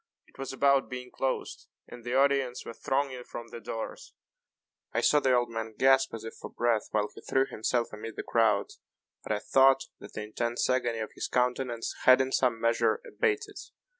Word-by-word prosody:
It -, -, -24 dB
was 135 Hz, -, -4 dB
about 140 Hz, 0 st, +3 dB
being 125 Hz, 0 st, -7 dB
closed, 135 Hz, -1 st, -3 dB, 0.2 s
and 120 Hz, -1 st, -11 dB
the 120 Hz, +2 st, -2 dB
audience 135 Hz, -2 st, +2 dB
were -, -, -6 dB
thronging 135 Hz, 0 st, -2 dB
from 120 Hz, -1 st, -8 dB
the 120 Hz, -, -8 dB
doors. 115 Hz, 0 st, -6 dB, 0.8 s
I -, -, +1 dB
saw 150 Hz, -, +5 dB
the 130 Hz, -3 st, +3 dB
old 120 Hz, -1 st, +1 dB
man 110 Hz, -1 st, -5 dB
gasp 135 Hz, 0 st, +4 dB
as 110 Hz, -, -8 dB
if 115 Hz, -, -7 dB
for -, -, -9 dB
breath 120 Hz, -2 st, 0 dB
while 105 Hz, -1 st, 0 dB
he -, -, -12 dB
threw 135 Hz, 0 st, +1 dB
himself 120 Hz, 0 st, -1 dB
amid 110 Hz, +1 st, -7 dB
the -, -, -5 dB
crowd; 110 Hz, -3 st, +2 dB, 0.5 s
but -, -, -6 dB
I 105 Hz, -, +2 dB
thought 135 Hz, +5 st, +4 dB, 0.2 s
that -, -, -12 dB
the 105 Hz, -, -4 dB
intense 115 Hz, +3 st, -1 dB
agony 120 Hz, -2 st, +1 dB
of 110 Hz, -1 st, -4 dB
his -, -, -4 dB
countenance 125 Hz, -1 st, -1 dB
had, 130 Hz, 0 st, +8 dB
in 130 Hz, 0 st, 0 dB
some 125 Hz, -4 st, +2 dB
measure, 115 Hz, -, +2 dB
abated. 445 Hz, -2 st, -1 dB
125 Hz, 195 wpm, -29 LUFS, 115-135 Hz, 0.8 s, had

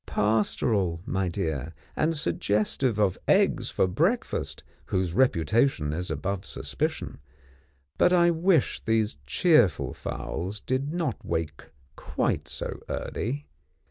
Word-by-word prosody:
Pastoral, 105 Hz, -4 st, +1 dB
my 95 Hz, -1 st, -1 dB
dear, 80 Hz, -4 st, -3 dB, 0.2 s
and 160 Hz, +1 st, +1 dB
suggestive 105 Hz, -2 st, 0 dB
of 100 Hz, -3 st, +2 dB
eggs -, -, +3 dB
for -, -, +2 dB
breakfast 170 Hz, -, -1 dB, 0.2 s
whose 90 Hz, -2 st, -1 dB
reputation 90 Hz, -, +2 dB
is 90 Hz, +3 st, -3 dB
above 100 Hz, -1 st, -2 dB
suspicion; -, -, -3 dB, 0.8 s
but 180 Hz, -, +5 dB
I 175 Hz, -1 st, +5 dB
wish 170 Hz, -2 st, +2 dB
these 110 Hz, -7 st, +1 dB
cheerful 90 Hz, -, +3 dB
fowls 95 Hz, +6 st, -5 dB
did 135 Hz, +3 st, -2 dB
not 165 Hz, -8 st, -2 dB
wake 80 Hz, -3 st, -3 dB, 0.3 s
quite -, -, -1 dB
so -, -, -4 dB
early. 140 Hz, +6 st, -3 dB
105 Hz, 110 wpm, -27 LUFS, 85-140 Hz, 0.8 s, but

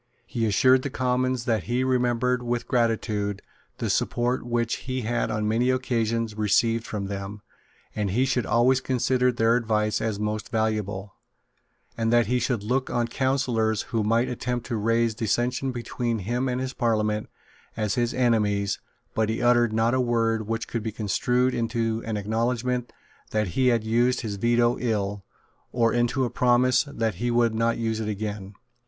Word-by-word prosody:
He 115 Hz, -1 st, -1 dB
assured 130 Hz, +5 st, +4 dB
the 140 Hz, -, -3 dB
Commons 130 Hz, -1 st, 0 dB
that 110 Hz, -5 st, 0 dB
he 120 Hz, +2 st, 0 dB
remembered 125 Hz, -1 st, +1 dB
with 120 Hz, -1 st, -2 dB
gratitude 110 Hz, -4 st, 0 dB, 0.3 s
the -, -, -2 dB
support 120 Hz, +2 st, 0 dB
which 120 Hz, -1 st, -1 dB
he 130 Hz, 0 st, -1 dB
had 120 Hz, +1 st, -1 dB
on 110 Hz, 0 st, -1 dB
many 115 Hz, +4 st, +2 dB
occasions 115 Hz, -3 st, 0 dB
received 115 Hz, +2 st, +1 dB
from 105 Hz, -2 st, -4 dB
them, 100 Hz, +1 st, -6 dB, 0.5 s
that 105 Hz, -2 st, -1 dB
he 120 Hz, +8 st, +2 dB
should 125 Hz, -2 st, 0 dB
always 125 Hz, +3 st, +3 dB
consider 125 Hz, 0 st, +1 dB
their 115 Hz, -1 st, +2 dB
advice 110 Hz, -3 st, 0 dB
as 110 Hz, -3 st, -2 dB
most 105 Hz, 0 st, -3 dB
valuable, 105 Hz, -3 st, -2 dB, 0.8 s
and 115 Hz, 0 st, 0 dB
that 120 Hz, -1 st, +4 dB
he 125 Hz, +4 st, +1 dB
should 120 Hz, -3 st, -1 dB
look 130 Hz, +4 st, 0 dB
on 120 Hz, -1 st, 0 dB
counsellors 120 Hz, -5 st, 0 dB
who 115 Hz, -2 st, +1 dB
might 115 Hz, +3 st, +2 dB
attempt 125 Hz, 0 st, -3 dB
to 120 Hz, -, -3 dB
raise 115 Hz, +1 st, +1 dB
dissension 120 Hz, +4 st, -1 dB
between 120 Hz, -1 st, -3 dB
him 120 Hz, +6 st, -1 dB
and 125 Hz, 0 st, -1 dB
his 130 Hz, 0 st, -3 dB
Parliament 110 Hz, -3 st, 0 dB, 0.5 s
as 110 Hz, -2 st, 0 dB
his 120 Hz, -1 st, 0 dB
enemies 105 Hz, -5 st, +1 dB, 0.3 s
but 110 Hz, -1 st, +1 dB
he 110 Hz, -, -1 dB
uttered 120 Hz, -2 st, +3 dB
not 115 Hz, +2 st, +2 dB
a 130 Hz, -, +2 dB
word 115 Hz, -3 st, 0 dB
which 115 Hz, 0 st, -2 dB
could 115 Hz, -, -3 dB
be 110 Hz, 0 st, -3 dB
construed 125 Hz, +5 st, 0 dB
into 115 Hz, -1 st, -1 dB
an 110 Hz, -2 st, -1 dB
acknowledgment 120 Hz, +4 st, -1 dB, 0.4 s
that 110 Hz, -3 st, 0 dB
he 130 Hz, +9 st, +1 dB
had 120 Hz, -3 st, +3 dB
used 120 Hz, +3 st, +2 dB
his 105 Hz, -4 st, -4 dB
Veto 120 Hz, +2 st, +2 dB
ill, 105 Hz, -4 st, -1 dB, 0.5 s
or 115 Hz, -2 st, +2 dB
into 120 Hz, +2 st, +1 dB
a 120 Hz, -, -4 dB
promise 125 Hz, +1 st, +3 dB
that 115 Hz, -6 st, -2 dB
he 120 Hz, -, +1 dB
would 120 Hz, -1 st, +2 dB
not 115 Hz, +1 st, +1 dB
use 115 Hz, -1 st, -1 dB
it 110 Hz, -1 st, -2 dB
again. 105 Hz, -1 st, -5 dB
115 Hz, 170 wpm, -25 LUFS, 110-125 Hz, 0.8 s, assured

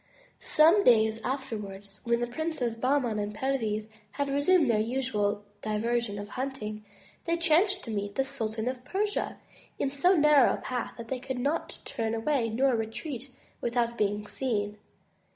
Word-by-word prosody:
Some 330 Hz, +7 st, +5 dB
days 220 Hz, -, +4 dB
afterwards, 205 Hz, -7 st, -5 dB
when 235 Hz, 0 st, +2 dB
the -, -, +2 dB
Princes 245 Hz, -2 st, -2 dB
Bahman 250 Hz, -2 st, +1 dB
and 205 Hz, 0 st, -3 dB
Perviz 220 Hz, -4 st, -1 dB, 0.3 s
had 285 Hz, -1 st, -1 dB
resumed 290 Hz, +3 st, +4 dB
their 225 Hz, -3 st, +3 dB
usual 215 Hz, -3 st, 0 dB, 0.2 s
diversion 220 Hz, 0 st, -1 dB
of 205 Hz, 0 st, -6 dB
hunting, 235 Hz, -5 st, -4 dB, 0.4 s
they 335 Hz, 0 st, +1 dB
chanced 360 Hz, +4 st, +3 dB
to 230 Hz, -, -6 dB
meet 205 Hz, -1 st, -3 dB
the 270 Hz, -, +2 dB
Sultan 220 Hz, -3 st, -3 dB
of 255 Hz, -1 st, -3 dB
Persia 410 Hz, +8 st, -1 dB, 0.4 s
in 270 Hz, -, 0 dB
so 350 Hz, +7 st, +4 dB
narrow 300 Hz, -4 st, +6 dB
a -, -, -6 dB
path 250 Hz, -2 st, -4 dB
that 230 Hz, -1 st, -8 dB
they 260 Hz, -, -2 dB
could 260 Hz, 0 st, -4 dB
not 280 Hz, +6 st, -1 dB
turn 225 Hz, -4 st, -2 dB
away 235 Hz, 0 st, +1 dB
nor 255 Hz, +3 st, +2 dB
retreat 230 Hz, +4 st, -4 dB, 0.3 s
with 240 Hz, +1 st, -2 dB
out 235 Hz, 0 st, +2 dB
being 210 Hz, -1 st, 0 dB
seen. 210 Hz, -4 st, -2 dB
240 Hz, 160 wpm, -29 LUFS, 215-275 Hz, 0.4 s, narrow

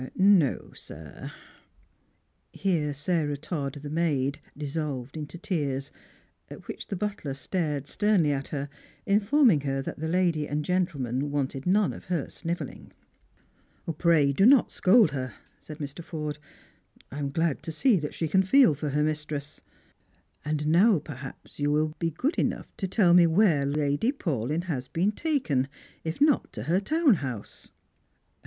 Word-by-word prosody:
"No, 190 Hz, -7 st, +3 dB
sir." 75 Hz, -2 st, -10 dB, 1.2 s
Here 165 Hz, -6 st, 0 dB
Sarah 145 Hz, 0 st, -1 dB
Todd, 145 Hz, -2 st, -4 dB
the 145 Hz, -, -5 dB
maid, 150 Hz, -4 st, 0 dB, 0.2 s
dissolved 145 Hz, -3 st, -4 dB
into 155 Hz, +2 st, -6 dB
tears; 145 Hz, -6 st, -2 dB, 0.6 s
at -, -, -11 dB
which -, -, -7 dB
the 200 Hz, -, -3 dB
butler 190 Hz, -8 st, -3 dB
stared 150 Hz, -2 st, -2 dB
sternly 195 Hz, -3 st, +2 dB
at 135 Hz, -1 st, -2 dB
her, 140 Hz, -1 st, -4 dB, 0.4 s
informing 210 Hz, -, +4 dB
her 135 Hz, -1 st, -2 dB
that -, -, -6 dB
the 160 Hz, -, -2 dB
lady 170 Hz, -3 st, +1 dB
and 150 Hz, 0 st, -2 dB
gentleman 145 Hz, -7 st, -1 dB
wanted 140 Hz, 0 st, -2 dB
none 200 Hz, +2 st, +3 dB
of -, -, -11 dB
her 170 Hz, -5 st, -2 dB
snivelling. 170 Hz, +1 st, -5 dB, 0.5 s
" 165 Hz, -4 st, -11 dB
Pray 160 Hz, -5 st, +4 dB
do 195 Hz, -, +2 dB
not 255 Hz, +2 st, +6 dB
scold 200 Hz, -3 st, +5 dB
her," 130 Hz, -2 st, -4 dB, 0.2 s
said 155 Hz, -, -10 dB
Mr. 145 Hz, +2 st, -6 dB
Forde. 150 Hz, -2 st, -5 dB, 0.4 s
" -, -, -30 dB
I 140 Hz, -, -6 dB
am 140 Hz, -1 st, -2 dB
glad 160 Hz, 0 st, 0 dB
to 160 Hz, -, -5 dB
see 220 Hz, -, +3 dB
that 150 Hz, -1 st, -5 dB
she 165 Hz, -, -1 dB
can 190 Hz, +5 st, +3 dB
feel 215 Hz, -, +5 dB
for 150 Hz, +1 st, -4 dB
her 150 Hz, +2 st, +1 dB
mistress. 150 Hz, -1 st, -3 dB, 0.8 s
And 150 Hz, 0 st, -2 dB
now 180 Hz, +7 st, +5 dB
perhaps 140 Hz, -2 st, -9 dB
you 145 Hz, 0 st, +1 dB
will 155 Hz, +1 st, +1 dB
be 165 Hz, -, 0 dB
good 255 Hz, -, -1 dB
enough -, -, -2 dB
to 190 Hz, -, -2 dB
tell 185 Hz, -2 st, +4 dB
me 175 Hz, -1 st, +7 dB
where 165 Hz, -5 st, +3 dB
Lady 145 Hz, -, +1 dB
Paulyn 155 Hz, -, -2 dB
has 135 Hz, -8 st, -3 dB
been 185 Hz, +9 st, +1 dB
taken 215 Hz, -, 0 dB, 0.4 s
—if 160 Hz, 0 st, -4 dB
not 295 Hz, -1 st, +3 dB
to -, -, -5 dB
her 175 Hz, +3 st, +2 dB
town 300 Hz, -, +3 dB
house?" 125 Hz, -7 st, -6 dB
155 Hz, 160 wpm, -27 LUFS, 145-185 Hz, 1.2 s, me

